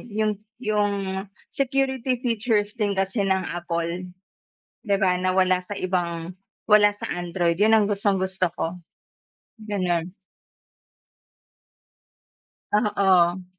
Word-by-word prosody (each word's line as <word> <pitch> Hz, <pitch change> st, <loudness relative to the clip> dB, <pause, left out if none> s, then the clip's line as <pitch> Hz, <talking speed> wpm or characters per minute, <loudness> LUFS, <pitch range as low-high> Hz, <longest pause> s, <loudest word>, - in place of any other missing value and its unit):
yung 215 Hz, 0 st, +1 dB, 0.3 s
yung 210 Hz, -3 st, +1 dB, 0.6 s
security 265 Hz, -2 st, 0 dB
features 220 Hz, -3 st, 0 dB
din 210 Hz, -3 st, 0 dB
kasi 195 Hz, +3 st, 0 dB
ng 190 Hz, -1 st, +2 dB
Apple, 170 Hz, +1 st, -3 dB, 0.8 s
di 200 Hz, -2 st, +2 dB
ba 185 Hz, -2 st, +3 dB
na 185 Hz, 0 st, +1 dB
wala 185 Hz, -1 st, +3 dB
sa 205 Hz, -, -8 dB
ibang 175 Hz, -2 st, -2 dB, 0.4 s
wala 210 Hz, 0 st, +7 dB
sa -, -, -6 dB
android, 175 Hz, -1 st, 0 dB
yun 215 Hz, +1 st, +5 dB
ang 210 Hz, -2 st, +3 dB
gustong-gusto 190 Hz, -2 st, 0 dB
ko, 165 Hz, +2 st, -2 dB, 0.9 s
gano'n. 180 Hz, -5 st, -1 dB, 2.6 s
Oo. 190 Hz, -4 st, +3 dB
190 Hz, 100 wpm, -24 LUFS, 180-210 Hz, 2.6 s, wala